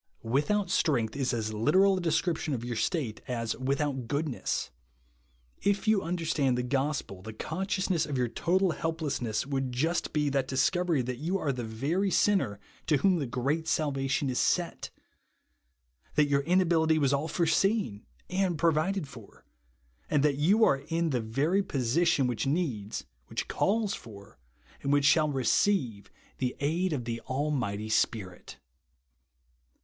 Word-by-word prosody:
" - - -38
Without 150 - 0
strength" 120 -8 +1
is 135 -2 0
as 110 -3 -2
literal 185 - +4
a 185 - -2
description 165 -3 0
of 120 -1 -5
your 120 -1 -3
state, 130 - -1
as 115 -2 -2
"without 135 -1 -1
goodness." 145 - -2 0.9
If 200 +2 0
you 215 -3 +4
under 170 -1 -3
stand 135 -5 +1
the 125 - -1
gospel, 135 -7 -2
the 110 +3 -8
consciousness 185 - -1
of 145 -3 -2
your 125 -1 +1
total 180 +8 +1
helplessness 145 -10 -2
would 135 -2 -2
just 160 +8 -1
be 150 -1 +1
the 135 0 +2
dis 130 0 +1
covery 175 -8 0
that 125 -1 -4
you 175 +6 -1
are 150 -7 -1
the 125 -2 -4
very 140 - -1
sinner 185 - +2 0.3
to 150 - +4
whom 185 +2 +3
the 140 - -2
great 140 +7 -1
salvation 140 -3 0
is 125 - -1
sent; 175 -2 0 1.3
that 150 - +5
your 140 -1 +2
inability 165 -1 +3
was 140 -3 +2
all 140 +3 0
foreseen 170 - +1 0.2
and 185 -2 0
provided 165 +2 +1
for, 120 -6 -14 0.6
and 145 -2 +2
that 150 -2 +3
you 195 +10 +4
are 140 - +3
in 165 +3 -2
the 125 -3 0
very 145 - +1
position 140 0 +1
which 125 0 -1
needs, 135 - -2 0.2
which - - -4
calls 210 0 +1
for, 100 - -11 0.4
and 140 - -1
Avhich 145 0 +3
shall 155 +1 +4
re 135 -3 -2
ceive, 115 - +1 0.3
the 125 -1 -1
aid 170 +6 0
of 130 -6 -2
the 115 0 -4
Almighty 130 -7 -1
Spirit. 95 - -1
145 Hz, 155 wpm, -29 LUFS, 125-170 Hz, 1.3 s, that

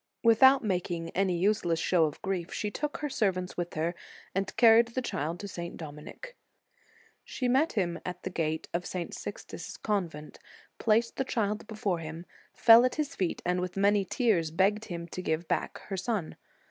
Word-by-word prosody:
Without 265 +4 +6
making 175 -4 -2
any 185 -1 +1
useless 180 -3 +1
show 170 -1 +3
of 150 -1 -4
grief, 185 -3 -2
she 210 -1 -3
took 295 +6 -3
her 300 - -3
servants 185 -8 -1
with 175 0 -4
her, 165 +2 0 0.4
and 195 0 -2
carried 230 0 +7
the 240 +2 -3
child 165 -4 -3
to 200 - -6
St. 170 -3 -6
Dominic. 155 - -9 0.9
She 255 - -3
met 270 +6 +3
him 175 -5 -1
at 180 0 -6
the 185 - -4
gate 160 -2 -2
of 175 +1 -2
St. 180 -2 -4
Sixtus - - -7
s - - -8
convent, 170 -8 -3 0.4
placed 230 +1 +2
the - - +1
child 220 -4 -2
before 210 -5 -2
him, 165 +2 -7 0.3
fell 230 +1 +7
at 255 - +1
his 305 -2 -2
feet, 185 -3 -2
and 180 0 +1
with 180 +1 -4
many 200 +1 +3
tears 190 -6 +1
begged 200 +6 +1
him 170 -3 -6
to 185 - -5
give 160 -2 0
her - - -20
back - - -1
her 195 - -4
son. 190 -3 -2
190 Hz, 185 wpm, -29 LUFS, 170-225 Hz, 0.9 s, carried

